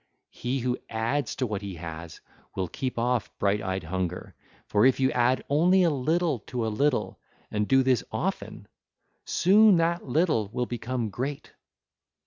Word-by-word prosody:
He 125 +2 -3
who 125 +1 -1
adds 115 +5 -1
to 130 - -1
what 105 -4 -3
he 100 -2 -6
has, 80 0 -8 0.3
will 95 -1 -1
keep 130 - -4
off 120 0 0
bright 100 +1 +1
eyed 95 -2 -3
hunger; 90 +1 -4 0.3
for 105 - +2
if 130 0 +4
you 130 0 +3
add 125 +1 +2
only 180 +6 +4
a 170 - +3
little 155 +1 0
to 120 -3 -2
a - - 0
little 140 +3 0 0.3
and 105 0 -1
do 135 0 +4
this 130 -3 +2
often, - - -4 0.6
soon 200 +1 +5
that 170 0 0
little 150 - +1
will 125 - -1
become 120 -1 -3
great. 135 +7 -5
125 Hz, 160 wpm, -27 LUFS, 105-145 Hz, 0.6 s, soon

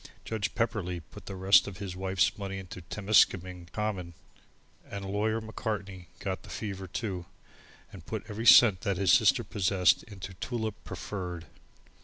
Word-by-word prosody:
Judge 110 -3 -2
Pepperleigh 100 -7 -1
put - - -12
the 95 - -5
rest 95 +1 +5
of 95 -2 -7
his 95 -2 -6
wife's 95 0 +1
money 100 -1 -5
into 90 -1 -8
Temiskaming 90 -2 +2
Common, 95 -5 -3 0.7
and 100 -1 -5
Lawyer 105 +3 0
Macartney 105 -4 -5
got 95 -1 -4
the - - -14
fever, 95 -3 -5
too, 95 -2 -4 0.7
and - - -10
put - - -5
every 110 +3 -3
cent 105 -7 +8
that 100 -2 -1
his 95 -2 +4
sister - - +5
possessed 95 -3 +2
into 95 -3 -9
Tulip 110 +2 -3
Preferred. 90 -4 -6
95 Hz, 150 wpm, -29 LUFS, 90-105 Hz, 0.7 s, cent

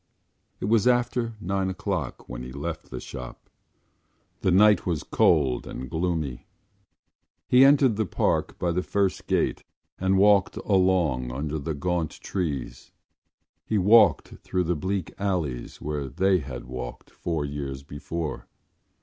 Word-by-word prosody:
It - - -3
was 110 +1 +3
after 120 -2 +1
nine 95 -1 -1
o’clock 95 - -4
when - - -6
he 60 +1 -7
left 80 +4 -5
the 65 - -6
shop. 60 -2 -9 0.9
The - - +1
night 105 +3 +5
was 85 -4 -2
cold 70 -7 +2
and 65 -1 -7
gloomy. 80 -7 -2 1.0
He 125 +1 +6
entered 135 -5 +5
the 110 -3 0
Park - - 0
by 85 - 0
the 90 +2 0
first 100 0 -1
gate - - 0 0.4
and 95 +1 +2
walked 100 -1 +4
along 90 - +2
under 75 +4 -3
the 80 +2 -3
gaunt 85 +1 -2
trees. 75 -10 -4 0.7
He 110 - -1
walked 100 -4 +5
through 90 - -2
the 85 +1 0
bleak 95 +3 -3
alleys 85 -11 -2
where 75 -2 -3
they 95 +6 +2
had 65 -4 -7
walked 65 -1 -7
four 80 -4 -3
years 70 -2 -5
before. 75 +2 -5
85 Hz, 140 wpm, -26 LUFS, 70-95 Hz, 1.0 s, He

